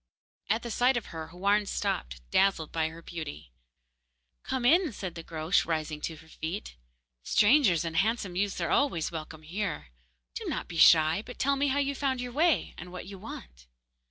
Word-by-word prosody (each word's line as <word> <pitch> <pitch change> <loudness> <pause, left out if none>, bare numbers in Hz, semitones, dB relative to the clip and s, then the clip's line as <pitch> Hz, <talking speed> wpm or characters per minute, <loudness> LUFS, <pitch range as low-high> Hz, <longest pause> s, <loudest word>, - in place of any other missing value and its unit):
At 220 +3 +1
the 235 - -5
sight 250 +3 +3
of 230 - -3
her 160 -1 -5
Houarn 200 +4 +1
stopped, - - -2
dazzled 190 -5 +2
by 160 -1 0
her 165 +1 -12
beauty. 75 - -7 0.9
'Come 255 -2 -2
in,' 325 +1 +4
said 185 -4 -5
the 170 - -7
Groac'h, 160 +2 0
rising 155 -2 -2
to 160 - -3
her 160 +1 -16
feet. 160 - -6 0.5
'Strangers 205 - +4
and 165 -1 -4
handsome 205 -3 +1
youths 200 +1 -1
are 170 - -1
always 170 - +1
welcome 160 -1 -7
here. 165 - -4 0.4
Do - - -6
not - - -3
be 170 - -7
shy, 160 +2 +6
but 245 - -10
tell 280 +1 +2
me 280 +1 +1
how 275 +1 +1
you 280 0 +1
found 270 -2 -1
your 245 0 -4
way, 300 - +2
and 180 +1 -9
what 180 - -7
you 195 -1 -9
want. - - -10
180 Hz, 185 wpm, -29 LUFS, 160-240 Hz, 0.9 s, shy